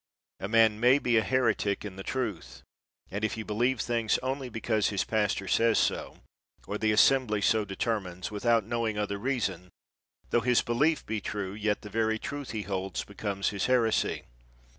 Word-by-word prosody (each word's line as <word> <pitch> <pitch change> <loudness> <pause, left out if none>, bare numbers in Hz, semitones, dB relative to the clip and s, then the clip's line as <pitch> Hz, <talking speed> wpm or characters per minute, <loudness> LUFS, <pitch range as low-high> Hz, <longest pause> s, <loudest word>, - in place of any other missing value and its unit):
A 95 - -3
man 110 -1 +4
may 125 +4 +5
be 120 -4 +2
a 110 - +3
heretic 105 -2 +1
in 100 -3 -7
the 95 - -7
truth; 90 - -4 0.5
and 100 +3 -4
if 110 - 0
he 110 - -5
believe 120 +4 0
things 115 -2 +1
only 130 0 -3
because 110 -2 0
his 100 -2 0
pastor 105 -3 0
says 115 +4 +3
so, - - 0 0.5
or 105 - -4
the 110 -1 +2
assembly 110 0 +4
so 105 +1 +2
determines, 95 -2 -3
without 115 +1 +2
knowing 115 -1 -1
other 100 -1 -2
reason, 100 -8 -2 0.6
tho 120 - +3
his 125 0 +3
belief 145 +7 +1
be 110 -1 -3
true, 100 -1 -4
yet 105 0 -1
the 105 - -8
very 110 0 +1
truth 145 +4 -6
he 110 -2 -3
holds 95 -1 -3
becomes 100 -1 -3
his 100 -1 -2
heresy. 120 -3 +1
110 Hz, 175 wpm, -29 LUFS, 100-120 Hz, 0.6 s, may